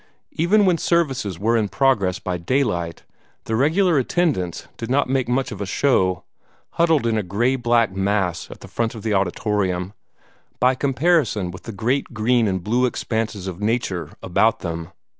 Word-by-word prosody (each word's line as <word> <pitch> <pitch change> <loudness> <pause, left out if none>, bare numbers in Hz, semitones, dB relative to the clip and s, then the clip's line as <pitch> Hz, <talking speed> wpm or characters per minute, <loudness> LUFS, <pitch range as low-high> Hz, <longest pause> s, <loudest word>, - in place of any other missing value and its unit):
Even 200 +6 +3
when 175 -3 +3
services 135 - 0
were 110 +6 +1
in 110 -3 +1
progress 100 -10 +2
by 90 - -3
daylight, 85 -3 -1 0.4
the 110 - -2
regular 160 - +3
attendants 130 - -1
did 115 - -6
not 140 +3 +2
make 130 -2 0
much 130 +2 0
of - - -7
a - - -1
show, 95 -6 +1 0.5
huddled 165 -6 +2
in 110 -2 +1
a - - 0
gray 110 +8 0
black 120 -3 +2
mass 95 -2 -1
at - - -11
the - - -10
front 115 0 -2
of 110 - -8
the 110 -2 0
auditorium, 95 -1 -1 0.7
by 125 +2 +4
comparison 135 - +1
with 90 - -11
the - - -2
great 120 +5 -1
green 115 +1 +2
and 95 -2 -2
blue 120 +5 +2
expanses 110 -5 -3
of 95 0 -6
nature 105 -5 -1
about 105 +5 +2
them. 85 -1 -4
115 Hz, 170 wpm, -22 LUFS, 95-135 Hz, 0.7 s, by